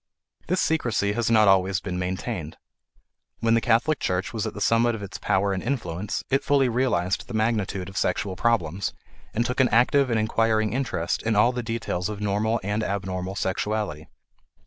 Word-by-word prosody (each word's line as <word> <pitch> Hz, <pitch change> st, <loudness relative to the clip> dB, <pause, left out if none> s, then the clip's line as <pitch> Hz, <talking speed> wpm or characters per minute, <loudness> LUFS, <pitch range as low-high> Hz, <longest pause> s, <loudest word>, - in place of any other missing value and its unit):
This 185 Hz, +1 st, +1 dB
secrecy 120 Hz, -10 st, +1 dB
has 115 Hz, +1 st, 0 dB
not 110 Hz, -2 st, +5 dB
always 95 Hz, -1 st, +3 dB
been 90 Hz, 0 st, -4 dB
maintained. 90 Hz, -2 st, -4 dB, 0.8 s
When 115 Hz, 0 st, +2 dB
the 115 Hz, -, +3 dB
Catholic 120 Hz, +7 st, +2 dB
Church 90 Hz, +3 st, -1 dB
was 110 Hz, -1 st, -2 dB
at 110 Hz, -, -6 dB
the -, -, -6 dB
summit 115 Hz, +2 st, +3 dB
of 105 Hz, -, -7 dB
its 100 Hz, -, -7 dB
power 100 Hz, +1 st, +1 dB
and 95 Hz, -, -2 dB
influence 105 Hz, -7 st, -3 dB
it 135 Hz, -, +2 dB
fully 140 Hz, -2 st, +3 dB
realized 115 Hz, -7 st, 0 dB
the 120 Hz, -, -6 dB
magnitude 105 Hz, -4 st, 0 dB
of 95 Hz, -, -10 dB
sexual 95 Hz, +1 st, 0 dB
problems 95 Hz, -4 st, 0 dB, 0.4 s
and 120 Hz, +2 st, 0 dB
took 125 Hz, +2 st, -2 dB
an 130 Hz, -2 st, +4 dB
active 130 Hz, +3 st, +3 dB
and 115 Hz, -2 st, +1 dB
inquiring 110 Hz, 0 st, +1 dB
interest 120 Hz, -10 st, -1 dB
in 110 Hz, -1 st, 0 dB
all 110 Hz, +4 st, +5 dB
the 125 Hz, -1 st, -3 dB
details 110 Hz, -6 st, -3 dB
of 105 Hz, -2 st, -5 dB
normal 105 Hz, +3 st, 0 dB
and 105 Hz, +3 st, -1 dB
abnormal 95 Hz, -2 st, -3 dB
sexuality. 100 Hz, -5 st, -2 dB
110 Hz, 180 wpm, -25 LUFS, 95-115 Hz, 0.8 s, not